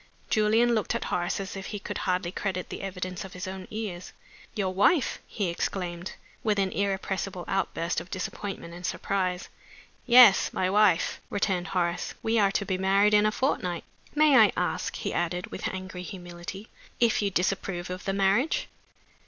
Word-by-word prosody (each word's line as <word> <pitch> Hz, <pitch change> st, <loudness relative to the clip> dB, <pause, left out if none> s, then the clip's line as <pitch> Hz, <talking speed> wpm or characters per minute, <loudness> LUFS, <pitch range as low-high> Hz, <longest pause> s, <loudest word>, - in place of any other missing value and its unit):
Julian 220 Hz, +3 st, +4 dB
looked 215 Hz, -3 st, 0 dB
at -, -, -1 dB
Horace 175 Hz, +2 st, 0 dB
as 195 Hz, 0 st, -5 dB
if 195 Hz, 0 st, -6 dB
he 210 Hz, -, -4 dB
could 200 Hz, -, -5 dB
hardly 180 Hz, -1 st, 0 dB
credit 185 Hz, -2 st, -3 dB
the -, -, -6 dB
evidence 185 Hz, -2 st, -4 dB
of 190 Hz, -, -10 dB
his 180 Hz, +2 st, -6 dB
own 190 Hz, 0 st, -6 dB
ears. 210 Hz, -5 st, -5 dB, 0.4 s
"Your 190 Hz, -4 st, -1 dB
wife!" 245 Hz, -, +3 dB
he 200 Hz, -4 st, -2 dB
exclaimed, 175 Hz, 0 st, -3 dB, 0.3 s
with 215 Hz, -2 st, +1 dB
an 195 Hz, -1 st, +1 dB
irrepressible 195 Hz, -2 st, -2 dB
outburst 180 Hz, -3 st, -1 dB
of 180 Hz, -, -12 dB
disappointment 185 Hz, -1 st, -5 dB
and 175 Hz, +1 st, -10 dB
surprise. 185 Hz, -1 st, -1 dB, 0.6 s
"Yes. 240 Hz, -4 st, +8 dB
My 185 Hz, 0 st, 0 dB
wife," 200 Hz, -4 st, +3 dB
returned 195 Hz, -3 st, 0 dB
Horace. 175 Hz, -2 st, -1 dB
"We 225 Hz, 0 st, +2 dB
are 200 Hz, -1 st, +4 dB
to 200 Hz, -, -1 dB
be 185 Hz, -2 st, -1 dB
married 195 Hz, +2 st, +4 dB
in 210 Hz, 0 st, +5 dB
a -, -, +2 dB
fortnight. 180 Hz, -9 st, -1 dB, 0.3 s
May 300 Hz, -3 st, +6 dB
I 215 Hz, -3 st, +7 dB
ask," 180 Hz, -, -1 dB
he -, -, -3 dB
added, 175 Hz, +1 st, -2 dB
with -, -, -3 dB
angry 185 Hz, -1 st, -6 dB
humility, 180 Hz, +2 st, -8 dB, 0.3 s
"if 235 Hz, -2 st, +3 dB
you 200 Hz, -, +1 dB
disapprove 180 Hz, -1 st, -1 dB
of 185 Hz, 0 st, -6 dB
the 195 Hz, -, 0 dB
marriage?" 200 Hz, -, +2 dB
190 Hz, 170 wpm, -27 LUFS, 180-210 Hz, 0.6 s, Yes